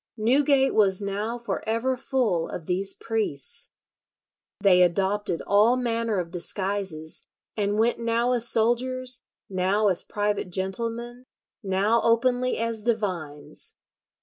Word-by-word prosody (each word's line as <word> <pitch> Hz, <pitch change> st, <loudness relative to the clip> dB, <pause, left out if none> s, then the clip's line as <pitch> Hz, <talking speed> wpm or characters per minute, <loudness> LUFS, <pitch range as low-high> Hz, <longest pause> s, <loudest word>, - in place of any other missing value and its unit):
Newgate 270 Hz, +4 st, +3 dB
was 195 Hz, -3 st, +3 dB
now 205 Hz, +4 st, -3 dB
for 235 Hz, 0 st, -4 dB
ever 235 Hz, +4 st, 0 dB
full 240 Hz, -10 st, -1 dB
of 165 Hz, -, -7 dB
these 195 Hz, +3 st, 0 dB
priests. 215 Hz, -, -3 dB, 0.9 s
They 190 Hz, -3 st, +5 dB
adopted 190 Hz, +1 st, +1 dB
all 210 Hz, +4 st, +4 dB
manner 230 Hz, -3 st, -1 dB
of 170 Hz, -2 st, -5 dB
disguises, 185 Hz, -3 st, -2 dB, 0.3 s
and 205 Hz, -1 st, 0 dB
went 230 Hz, +2 st, +2 dB
now 235 Hz, +1 st, +1 dB
as 240 Hz, -1 st, +4 dB
soldiers, 250 Hz, +2 st, +1 dB, 0.3 s
now 195 Hz, +3 st, +1 dB
as 185 Hz, -, +2 dB
private 205 Hz, -2 st, -2 dB
gentlemen, 230 Hz, +7 st, -3 dB, 0.4 s
now 200 Hz, +3 st, +1 dB
openly 245 Hz, +2 st, +2 dB
as 230 Hz, -1 st, -1 dB
divines. 185 Hz, -10 st, -4 dB
215 Hz, 120 wpm, -25 LUFS, 190-235 Hz, 0.9 s, They